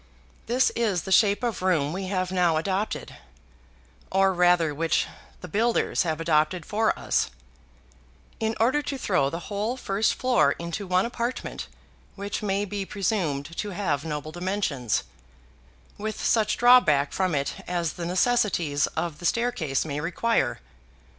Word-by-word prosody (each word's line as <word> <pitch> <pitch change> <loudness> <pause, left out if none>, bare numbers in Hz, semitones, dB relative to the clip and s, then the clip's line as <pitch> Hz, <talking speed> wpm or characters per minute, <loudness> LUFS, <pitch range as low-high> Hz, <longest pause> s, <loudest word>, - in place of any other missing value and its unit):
This 250 +3 +3
is 210 -8 0
the 190 - -6
shape 205 +3 +4
of 235 -6 -1
room 165 -6 +1
we 190 +1 -4
have 185 -1 -1
now 175 -3 +2
adopted, 195 +5 -2 0.9
or 195 0 +3
rather 175 -3 +3
which 165 +3 +1 0.4
the 180 - -7
builders 230 +5 +1
have 160 -3 -1
adopted 155 +1 +1
for 220 +1 +1
us, - - 0 1.1
in 220 0 -1
order 255 +6 +3
to 280 -1 -4
throw 180 - +1
the 165 +4 -5
whole 210 +7 -3
first 205 -2 0
floor 255 -1 +3
into 170 +4 -5
one 185 +2 +2
apartment 240 +1 -4 0.5
which 200 +1 -4
may 200 -1 0
be 200 0 -3
presumed 170 -7 -2
to 210 - -2
have 150 -9 0
noble 155 -1 -4
dimensions, 175 - -1 1.0
with 215 +1 -4
such 220 -2 +2
drawback 200 - +5
from 185 -4 0
it 140 0 -2
as 170 -3 -1
the 170 - -5
necessities 180 -7 +2
of 160 -2 -2
the 175 - -7
staircase 220 - 0
may 145 -2 -3
require. 180 - 0
185 Hz, 145 wpm, -26 LUFS, 165-215 Hz, 1.1 s, drawback